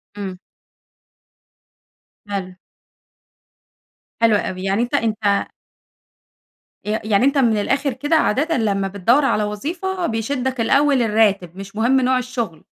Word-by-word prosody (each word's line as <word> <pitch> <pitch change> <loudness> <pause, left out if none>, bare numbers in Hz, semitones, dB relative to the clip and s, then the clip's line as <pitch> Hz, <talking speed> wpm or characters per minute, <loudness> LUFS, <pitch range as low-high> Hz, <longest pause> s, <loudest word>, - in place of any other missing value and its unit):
امم. 190 -3 -6 1.9
حلو. 190 -2 -4 1.7
حلو 225 -2 +5
أوي. 185 -2 -3
يعني 195 +4 0
أنتَ 245 - -6
أنتَ 215 -3 0 1.4
ي - - -4
يعني 215 +2 +2
أنتَ 280 +1 +2
من 230 -5 +3
الآخر 270 +5 0
كده 290 +6 0
عادةً 310 +3 +1
لمّا 200 -4 0
بتدوَّر 230 +9 +2
على 215 -5 +1
وظيفة، 340 - -3
بيشدك 250 +2 -2
الأول 275 +2 +3
الراتب 205 -6 +1
مش 195 +1 -9
مهم 245 +5 +2
نوع 255 0 +2
الشغل؟ 235 -10 -4
225 Hz, 115 wpm, -20 LUFS, 200-265 Hz, 1.9 s, حلو